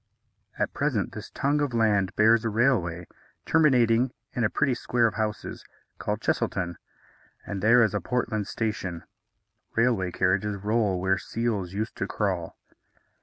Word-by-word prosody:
At - - -1
present - - -1
this - - -8
tongue 145 +2 0
of 140 -5 -1
land 105 -4 +2
bears 110 +2 +5
a 115 - 0
railway, 105 -7 +1 0.4
terminating 125 -6 +4 0.2
in 125 - -1
a 110 - +3
pretty 135 +3 +1
square 120 0 +1
of 110 - +1
houses, 110 -1 -3 0.4
called - - -2
Chesilton, 85 -2 -1 0.7
and 100 -1 -4
there 120 +4 +6
is 110 - +1
a 105 - -1
Portland 110 -1 -1
station. 95 -7 -3 0.7
Railway 115 -6 +2
carriages 100 +4 0
roll 105 -2 0
where 95 +1 +1
seals 105 -6 -2
used 110 +3 -3
to 100 - -2
crawl. 95 -6 -2
110 Hz, 145 wpm, -26 LUFS, 95-120 Hz, 0.7 s, there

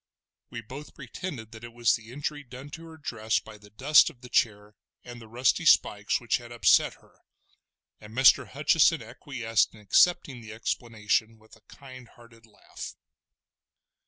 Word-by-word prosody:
We 120 - -7
both 135 +7 -11
pretended 125 -12 -7
that 110 0 -12
it 120 0 -10
was 120 -1 +2
the 110 0 -6
injury 145 +2 -5
done 130 +2 -11
to 165 +2 -9
her 160 -1 -12
dress 110 -7 -1
by 110 -1 -14
the 105 0 -17
dust 135 +8 +4
of 120 - -18
the 125 - -12
chair, 105 -3 0 0.3
and 120 0 -10
the 110 - -12
rusty 125 +9 +1
spikes 105 -8 +3
which 120 - 0
had 120 -1 -13
upset 120 -2 +3
her, - - -26 0.8
and 105 - -13
Mr. 130 +3 +5
Hutcheson - - +2
acquiesced 115 -2 -1
in - - -15
accepting 130 - +2
the 110 -1 -10
explanation 110 -1 -2
with 110 +1 -20
a 110 - -23
kind 130 -3 -13
hearted 115 -1 -19
laugh. 105 - -10
120 Hz, 165 wpm, -27 LUFS, 110-130 Hz, 0.8 s, Mr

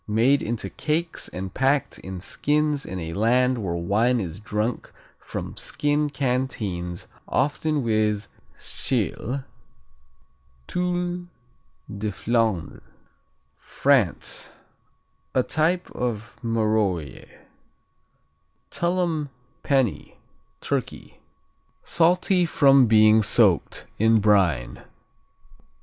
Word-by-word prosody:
Made 120 +7 +3
into 115 0 -3
cakes 160 +2 -2
and 95 +1 -6
packed 135 +1 +1
in 95 -1 -7
skins 150 +6 0
in 95 - -5
a 80 -1 -5
land 125 +5 +2
where 90 -5 -2
wine 110 +8 +1
is 90 -3 -5
drunk 110 +2 -3 0.3
from - - -6
skin 150 0 0
canteens, 115 -11 -2 0.2
often 145 +1 0
with 110 -2 0 0.3
Tschil. 130 +3 -2 1.2
Tuile 180 - -2 0.7
de 105 +1 -1
Flandre 115 -7 -1 0.7
France 135 -11 0 0.8
A 130 - +4
type 170 +6 0
of 115 -2 -4
Marolles. 105 - -1 1.4
Tullum 170 -4 0 0.3
Penney 135 -6 0 0.4
Turkey - - -4 0.6
Salty 180 +1 +3
from 135 -5 +5
being 110 0 +6
soaked 105 -4 +2
in 110 +1 +4
brine. 90 - +2
120 Hz, 85 wpm, -24 LUFS, 105-145 Hz, 1.4 s, being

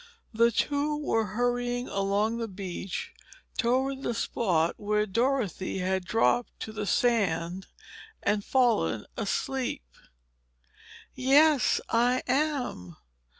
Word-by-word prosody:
The 230 +1 +4
two 290 +5 0
were 225 -7 0
hurrying 245 0 0
along 200 +4 0
the 230 - -2
beach 190 -2 -6 0.5
toward 265 +3 +1
the 240 - -2
spot 175 -8 0
where 210 0 +1
Dorothy 220 - -1
had 190 0 -1
dropped 225 +4 +1
to 220 - -5
the 215 -1 -4
sand 190 -7 +1 0.6
and 205 0 +1
fallen 215 - +1
asleep. 260 - -2 1.3
"Yes, 280 +2 +4
I 245 +2 +2
am." 255 - -1
230 Hz, 105 wpm, -28 LUFS, 195-255 Hz, 1.3 s, The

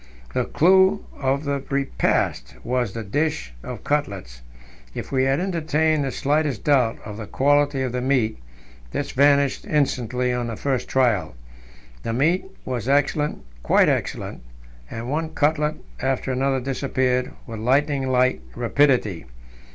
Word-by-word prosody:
The - - 0
clou 190 +4 +4
of 135 +1 0
the 140 -2 -2
repast 135 - 0
was 120 -4 -1
the 115 - -4
dish 100 - -1
of 120 - -7
cutlets. 100 - -2 0.5
If - - -6
we 130 -1 +2
had 135 +2 +2
entertained 160 -4 +1
the 135 - -2
slightest 145 -4 0
doubt 130 -6 +3
of 105 -1 -7
the 110 -2 -7
quality 145 +2 +2
of 130 - -2
the 125 0 -2
meat, 125 - +1 0.5
this - - -2
vanished 140 0 +3
instantly 125 -4 0
on 120 -1 -2
the 115 - -4
first 135 +2 -2
trial. 120 - +1 0.7
The 115 - -3
meat 160 +9 +2 0.2
was 125 -1 -3
excellent, 145 - +1 0.2
quite - - +4
excellent, - - -2 0.5
and 115 +1 -6
one 160 +3 -2
cutlet 150 0 +1 0.2
after 135 0 -1
another 135 +1 +1
disappeared 130 -1 -1
with 115 -2 -7
lightning 135 +3 +1
like 130 0 +2
rapidity. 120 - +2
135 Hz, 140 wpm, -23 LUFS, 120-145 Hz, 0.7 s, clou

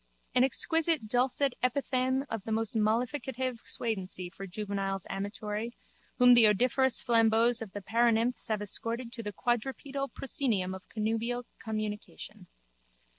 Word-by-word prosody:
An 250 - +4
exquisite 320 +1 +3
dulcet 255 +3 +1
epithalame 260 +1 0
of 225 -2 -4
most 220 -1 0
mollificative 250 +3 -1
suadency 185 -5 -1
for 195 - -8
juveniles 195 -1 -3
amatory 210 +3 -4 0.4
whom 245 -1 +7
the 235 -2 +8
odoriferous 250 +5 +2
flambeaus 230 0 +4
of 215 -4 -7
the 205 - -6
paranymphs 235 +2 +1
have 215 -2 -1
escorted 230 +4 -3
to 235 - -6
the 210 -2 -4
quadrupedal 265 +5 -2
proscenium 225 - -1
of 190 -1 -10
connubial 225 +3 -2
communion. 215 - -6
230 Hz, 125 wpm, -30 LUFS, 210-250 Hz, 0.4 s, the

